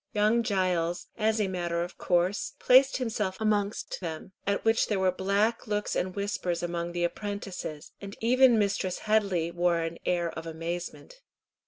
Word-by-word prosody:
Young 215 +3 +3
Giles, 180 -5 0
as 220 0 +1
a 210 - +1
matter 175 -2 -1
of 175 - -9
course, 180 +2 +1
placed 265 +2 +5
himself 215 -6 -2
amongst 210 -1 -1
them, 165 +1 -6 0.2
at 200 +2 0
which 225 0 +3
there 210 - 0
were 190 -1 +3
black 200 +6 0
looks 210 -1 -1
and 185 0 -1
whispers 185 -4 -2
among 170 0 -3
the 175 0 -1
apprentices, 185 -4 -4
and 200 0 -7
even 250 +1 +5
Mistress 195 -3 0
Headley 200 -6 +1
wore 175 0 +2
an 165 0 -4
air 175 -2 0
of 165 0 -7
amazement. 175 - -6
190 Hz, 160 wpm, -28 LUFS, 175-215 Hz, 0.2 s, placed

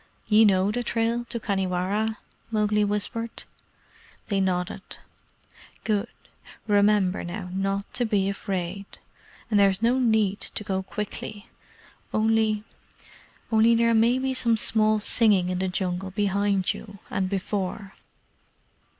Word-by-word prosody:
"Ye 220 +1 +5
know 195 0 +3
the 245 +3 -2
trail 235 0 -1
to 235 0 -4
Khanhiwara?" 200 +2 -1 0.3
Mowgli 210 -1 +1
whispered. 210 +3 -2 0.9
They 200 -2 +1
nodded. 180 -1 -1 1.0
"Good. 210 0 0 0.6
Remember, 205 -2 +3
now, 180 +2 -6
not 195 +2 -2
to 245 -1 +1
be 205 -4 +1
afraid. 195 -1 -3 0.7
And 210 - +4
there 200 -1 +6
is 195 +3 -2
no 245 +3 +3
need 220 -5 +2
to - - -5
go 190 -2 -1
quickly. 210 +1 -6 0.7
Only 220 -1 +2 0.9
only 225 +1 +5
there 230 0 +3
may 230 +3 +4
be 265 0 -1
some 235 -3 +2
small 215 0 +2
singing 205 -4 +3
in 180 0 -2
the 190 - 0
Jungle 185 0 -2
behind 200 -1 +1
you 200 -2 -10
and 190 -1 -1
before." 195 0 -3
205 Hz, 125 wpm, -25 LUFS, 190-225 Hz, 1.0 s, there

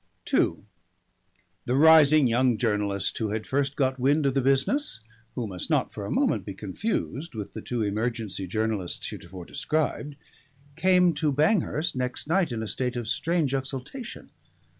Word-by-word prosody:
II - - +2 1.0
The 125 - 0
rising 155 -1 +7
young 120 0 +2
journalist 105 -4 0
who 110 -2 -1
had 110 +1 -3
first 140 +1 0
got 130 -2 0
wind 140 +4 +2
of 135 - +2
the 135 - +2
business 135 - +1 0.4
who 120 - -2
must 95 -4 -4
not - - +1
for - - -5
a - - -5
moment - - +1
be 100 - -7
confused 140 - -3
with 105 -2 -6
the - - -6
two 120 -3 -2
emergency 105 -2 -2
journalists 110 -2 -2
heretofore 90 0 -9
described 150 - -2 0.6
came 180 0 +4
to 150 0 0
Banghurst 155 +1 +1
next 125 0 -2
night 170 -1 +1
in 110 -2 -3
a - - -4
state 125 +3 -2
of 120 -2 -4
strange 160 0 0
exultation. 135 - -5
130 Hz, 160 wpm, -26 LUFS, 110-150 Hz, 1.0 s, rising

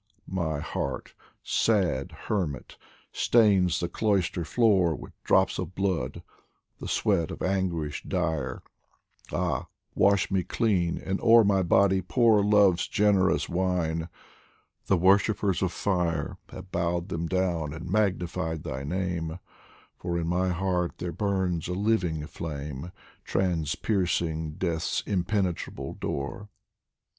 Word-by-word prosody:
My 80 -5 -2
heart, 70 -2 -4 0.3
sad 90 -12 +1
hermit, 85 -10 -2 0.4
stains 95 -7 +3
the 85 - -1
cloister 95 -2 0
floor 95 -4 +3
With - - -10
drops - - +3
of 90 - -5
blood, 95 -3 -1 0.6
the - - -6
sweat 85 -6 +1
of - - -6
anguish 90 -6 -1
dire; 80 -8 -2 0.7
Ah, 85 -7 -1 0.3
wash 100 0 +3
me 95 -1 +2
clean, 90 -2 0
and 95 +1 -3
o'er 115 0 +7
my 100 -2 +3
body 95 +1 +3
pour 105 +4 +3
Love's 100 -4 +4
generous 100 -2 +2
wine! 85 -2 -1 0.8
the 95 - +3
worshippers 100 +1 +3
of 95 -2 +1
fire 85 -7 -1
Have 90 0 -10
bowed 85 +1 -1
them 85 -2 -2
down 85 -4 0
and 80 +3 -7
magnified 90 -5 -1
my 65 +1 -4
name, 85 0 -2 0.6
For 85 -1 -2
in 85 -1 -2
my 90 +2 +1
heart 90 -1 -1
there 85 0 -4
burns 95 -2 -1
a 90 - -2
living 90 -6 0
flame, 75 0 -6 0.3
Transpiercing 85 -2 0
Death's 85 -3 -1
impenetrable 95 -1 -2
door. 70 +9 -4
90 Hz, 120 wpm, -27 LUFS, 80-95 Hz, 0.8 s, o'er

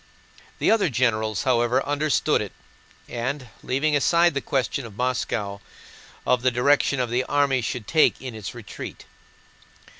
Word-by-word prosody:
The - - +2
other 215 -6 +3
generals, 110 -5 0
however, 125 0 +2
understood 145 -1 +1
it - - -6 0.5
and, 130 +2 -4
leaving 145 +4 0
aside 170 +4 +4
the 140 - -1
question 135 0 -1
of 110 -3 -11
Moscow, 115 -5 -1
spoke 100 - -26 0.6
of 125 - +2
the 130 - +3
direction 130 0 +2
the 125 +2 +1
army 140 -3 +2
should 115 -1 -4
take 160 -2 +3
in 130 -2 -7
its 110 -3 -7
retreat. - - -8
130 Hz, 145 wpm, -24 LUFS, 120-145 Hz, 0.6 s, aside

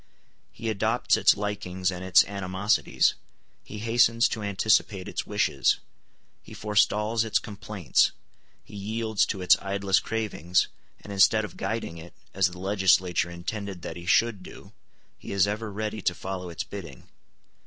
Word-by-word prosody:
He 115 - -7
adopts 110 +2 +1
its - - +4
likings 95 -3 -2
and 90 0 -6
its 90 -2 +5
animosities, 100 +1 +1 0.5
he 105 - -9
hastens 115 +1 +3
to 110 - -4
anticipate 100 -1 +1
its - - -4
wishes, 70 - +1 0.6
he - - -13
forestalls 105 +1 +1
its 110 - +1
complaints, 105 -4 0 0.5
he - - -14
yields 110 +1 -1
to 95 -3 -4
its 90 - +7
idlest 100 -1 +1
cravings, 105 -6 0 0.3
and 100 - -8
instead 105 +3 +4
of - - -11
guiding 110 -7 -4
it, 85 +2 -13 0.2
as 95 -1 +3
the 90 0 -9
legislature 95 -2 +2
intended 90 +1 -6
that 80 - -6
he 85 0 -10
should 105 +1 +3
do, - - -12 0.5
he - - -9
is 100 -1 +3
ever 105 +1 -3
ready 110 +1 -4
to 85 - 0
follow 95 -1 -5
its 85 - -4
bidding. 85 -10 -10
100 Hz, 150 wpm, -26 LUFS, 90-110 Hz, 0.6 s, its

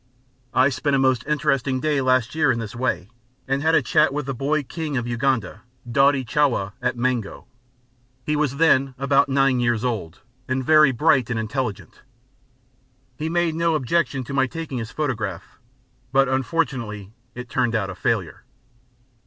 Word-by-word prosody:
I 130 +2 +5
spent 140 +1 0
a - - +3
most 130 -3 +2
interesting 140 -3 0
day 150 0 0
last 130 -3 +1
year 155 -3 +3
in 115 - -1
this 115 -1 -6
way, 100 -8 -2 0.4
and 135 +1 0
had 160 +2 +3
a - - +3
chat 150 +4 +3
with 145 0 -3
the 135 - -3
boy 145 +4 -1
King 150 0 -4
of 120 - -2
Uganda, 120 -4 -1 0.3
Daudi 135 +2 +3
Chwa, 120 -7 +1
at - - -1
Mengo. 120 -4 -2 0.8
He 150 - 0
was 145 -2 0
then 135 -4 +3
about 140 +1 +2
nine 135 -1 +2
years 120 -1 0
old, 95 -9 -4 0.3
and 130 0 -2
very 155 -2 +6
bright 130 -1 +2
and 115 -2 -1
intelligent. 110 -1 -4 1.1
He 155 +5 -3
made 170 -1 +1
no 165 0 +1
objection 140 -2 0
to 130 - -7
my 135 -1 +2
taking 155 -3 -5
his 110 -1 -5
photograph, 110 - -4 0.5
but 135 0 +3
it 130 - -1
unfortunately 130 - -2 0.4
turned 120 -1 0
out 100 -3 -1
a - - -6
failure. 90 - -2
130 Hz, 165 wpm, -22 LUFS, 120-145 Hz, 1.1 s, very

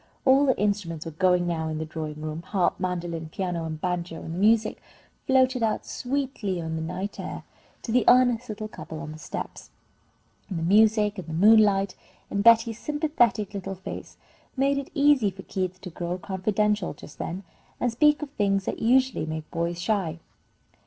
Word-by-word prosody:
All 275 +2 +5
the 260 - +3
instruments 200 -6 -1
were 165 - -5
going 180 +2 +2
now 165 -2 -1
in 155 0 -3
the 160 - -3
drawing 155 -1 -6
room, 155 +1 -4
harp, 185 +1 0
mandolin, 175 -3 -3
piano, 175 -1 -3
and 155 -1 -5
banjo, 175 -1 -2
and 165 - -7
the 175 - -4
music 220 +2 +3 0.5
floated 260 -1 +3
out 220 -1 0
sweetly 250 -8 -2
on 160 -1 -3
the 160 - -3
night 180 +5 -4
air - - -6 0.4
to 230 - -4
the 250 +1 +4
earnest 245 -1 +5
little 215 0 -4
couple 160 -6 -9
on 160 -1 -6
the 155 - -10
steps. - - -7 0.8
And 185 - -3
the 165 - -2
music, 210 +2 +4
and 175 - -8
the 160 - -5
moonlight, 200 +1 +5 0.4
and 200 0 0
Betty's 230 0 +5
sympathetic 295 - +1
little 195 -1 -4
face, 190 - -8 0.4
made 280 +1 +2
it 280 - -7
easy 280 -7 +4
for 190 0 -10
Keith 185 -1 -3
to 180 - -8
grow 175 +2 -3
confidential 205 0 -1
just 150 - -13
then, 185 +4 -4 0.4
and 245 - +1
speak 300 +5 +3
of 285 - -7
things 195 -6 0
that - - -3
usually 255 -7 +2
make 155 -1 -5
boys 170 0 -2
shy. 185 -4 -1
195 Hz, 180 wpm, -26 LUFS, 170-230 Hz, 0.8 s, All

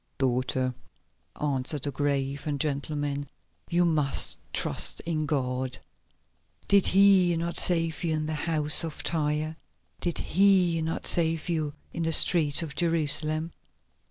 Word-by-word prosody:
"Daughter," 130 0 0 0.7
answered 140 -1 -2
the 145 - -2
grave 140 0 -2
and 145 -2 -2
gentle 150 0 -2
man, 145 -1 -3 0.4
"you 175 0 +2
must 150 -5 0 0.2
trust - - +1
in 155 -2 -3
God. 130 -3 -2 0.9
Did 200 -1 +4
He 190 -3 +4
not 170 +1 0
save 165 -2 +3
you 160 -2 0
in 155 0 -2
the 155 - -3
house 150 0 +2
at 165 -2 -4
Tyre? 155 0 -1 0.4
Did 175 -2 -3
He 180 -2 +2
not 160 +1 -3
save 165 -1 +1
you 155 -3 -2 0.2
in - - -4
the 165 0 0
streets 155 -2 +4
of 155 -3 -7
Jerusalem? 155 -1 0
155 Hz, 135 wpm, -27 LUFS, 145-165 Hz, 0.9 s, Did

